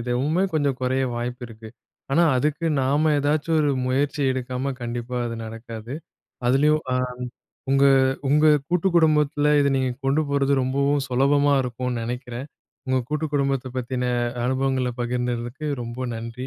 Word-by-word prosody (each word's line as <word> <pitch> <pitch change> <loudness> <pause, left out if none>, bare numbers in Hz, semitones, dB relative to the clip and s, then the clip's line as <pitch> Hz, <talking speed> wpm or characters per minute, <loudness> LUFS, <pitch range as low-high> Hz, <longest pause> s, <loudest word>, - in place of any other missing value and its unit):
இதுவுமே 130 +9 0
கொஞ்சம் 140 -4 0
குறைய 130 +1 0
வாய்ப்பு 120 +1 -4
இருக்கு. 110 -1 -11 0.4
ஆனா 170 - +4
அதுக்கு 150 +5 0
நாம 145 +4 +2
ஏதாச்சும் 155 +3 +1
ஒரு 145 -1 +2 0.2
முயற்சி 140 +3 0
எடுக்காம 130 +1 -3
கண்டிப்பா, 120 +1 -4
அது 115 - -4
நடக்காது. 115 +2 -8 0.5
அதிலயும் 150 +4 +3
அ - - +1 0.8
உங்க 135 0 +4 0.4
உங்க 150 +2 +4 0.2
கூட்டுக்குடும்பத்தில 160 -5 +2
இதை 140 0 +3
நீங்க 130 -1 0 0.2
கொண்டு 140 +3 +2
போறது 140 0 +1
ரொம்பவும் 140 +2 +1
சுலபமா 140 +3 +3
இருக்கும்னு 125 -1 -3
நெனைக்கிறேன். 125 +2 -5 0.4
உங்க 130 0 +2
கூட்டு 150 +1 -1
குடும்பத்த 135 -2 0
பத்தின 125 0 -2 0.4
அனுபவங்கள்ல 130 0 0
பகிர்ந்ததுக்கு 120 +3 -3 0.2
ரொம்ப 120 +2 -5
நன்றி. 115 +3 -6
130 Hz, 130 wpm, -23 LUFS, 125-145 Hz, 0.8 s, ஆனா